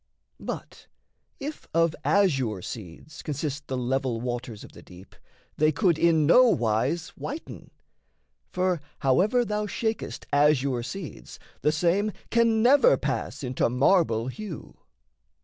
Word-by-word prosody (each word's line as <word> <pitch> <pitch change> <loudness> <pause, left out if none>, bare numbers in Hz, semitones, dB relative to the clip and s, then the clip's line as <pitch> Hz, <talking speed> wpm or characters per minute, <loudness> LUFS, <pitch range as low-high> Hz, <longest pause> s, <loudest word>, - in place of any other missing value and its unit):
But - - -7 0.5
if 295 +2 -7
of 165 -1 +3
azure 135 - +1
seeds 110 - -9
Consist 145 -1 -4
the 130 - -3
level 125 -1 -1
waters 120 -2 -5
of - - -12
the - - -14
deep, 90 +1 -15 0.4
They 155 +1 +4
could 165 +1 +1
in 160 -3 +4
nowise 160 - +3
whiten: 300 +5 -8 0.8
for 180 -3 0 0.2
however 195 - +3
Thou 210 -1 -2
shakest 220 +2 -3
azure 140 -3 +3
seeds, 155 +6 -8 0.2
the 150 - +3
same 180 +6 +1 0.2
can 230 -1 +3
never 285 - +6
Pass - - -3
into 125 -2 0
marble 125 - +2
hue. 165 +5 -7
155 Hz, 120 wpm, -26 LUFS, 125-200 Hz, 0.8 s, never